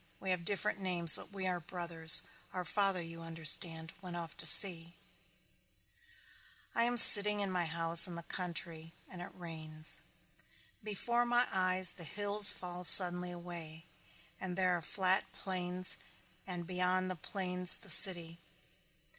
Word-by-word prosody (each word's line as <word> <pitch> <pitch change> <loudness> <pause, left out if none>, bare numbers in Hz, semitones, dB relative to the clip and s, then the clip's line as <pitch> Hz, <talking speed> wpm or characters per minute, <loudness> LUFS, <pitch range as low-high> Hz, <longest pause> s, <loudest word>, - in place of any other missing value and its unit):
"We 190 - -7
have 180 -2 -5
different 200 +2 -4
names 175 -4 +2
but - - -11
we 195 -1 -9
are 180 -1 -5
brothers. 170 -2 0 0.3
Our 180 -1 -8
father 195 -1 -4
you 165 0 -13
understand 165 0 -2
went 180 -2 -11
off 170 -2 -10
to - - -1
sea." 170 -3 +4 1.8
I 230 - -2
am 245 0 -5
sitting 210 -2 +8
in 200 -2 -6
my 180 -2 -4
house 165 +2 +4
in 175 - -11
the 170 - -11
country 165 -2 -9
and 180 -2 -14
it 175 - -11
rains. 160 -3 -8 0.8
Before 235 +3 -5
my 240 +1 -2
eyes 185 -1 -1
the 175 - -11
hills 205 +5 +2
fall 180 0 -8
suddenly 180 0 +6
away 170 -2 -13 0.5
and 185 -1 -9
there 185 -1 -2
are 175 - -8
the - - -14
flat 190 0 -4
plains 180 -1 -6 0.5
and 175 -2 -9
beyond 185 +1 -5
the - - -9
plains 180 +1 +1
the - - -15
city. 170 -3 +2
180 Hz, 150 wpm, -30 LUFS, 170-190 Hz, 1.8 s, sitting